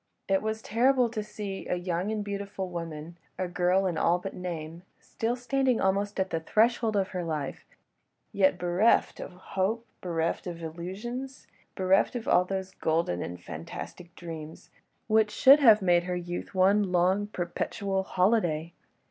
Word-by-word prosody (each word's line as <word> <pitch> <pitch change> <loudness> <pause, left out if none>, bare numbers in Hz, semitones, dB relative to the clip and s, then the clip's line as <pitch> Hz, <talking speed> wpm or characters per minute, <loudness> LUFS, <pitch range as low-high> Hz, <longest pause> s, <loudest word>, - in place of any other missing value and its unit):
It 195 0 +2
was 220 0 -3
terrible 250 +2 +3
to 220 -2 -3
see 210 -2 -6
a - - 0
young 175 +2 -2
and 215 -1 -2
beautiful 200 -2 -4
woman—a 165 +2 -6
girl 180 +2 +2
in 175 -4 -1
all 175 - +3
but 185 +2 -6
name—still 180 +6 -5
standing 255 0 +1
almost 200 +1 0
at 190 0 0
the 165 - 0
threshold 220 +5 +2
of 195 -2 +1
her 180 -1 -3
life, 155 -4 -4 0.7
yet 190 -2 +3
bereft 180 +6 +2
of - - -7
hope, 190 +5 -2 0.2
bereft 170 0 -2
of 170 -1 -6
illusions, 210 +11 -6 0.3
bereft 190 +5 +2
of 235 - -4 0.2
those 190 -1 -3
golden 160 - 0
and 90 0 -6
fantastic 90 - -8
dreams, 160 -2 -9 0.3
which 215 -1 +3
should 275 +6 +7
have 220 -7 +6
made 175 -1 +3
her 180 0 -2
youth 175 +2 -5
one 195 +1 +3
long, 185 +3 +2
perpetual 195 +1 -2
holiday. 180 -5 +1
190 Hz, 150 wpm, -28 LUFS, 175-210 Hz, 0.7 s, should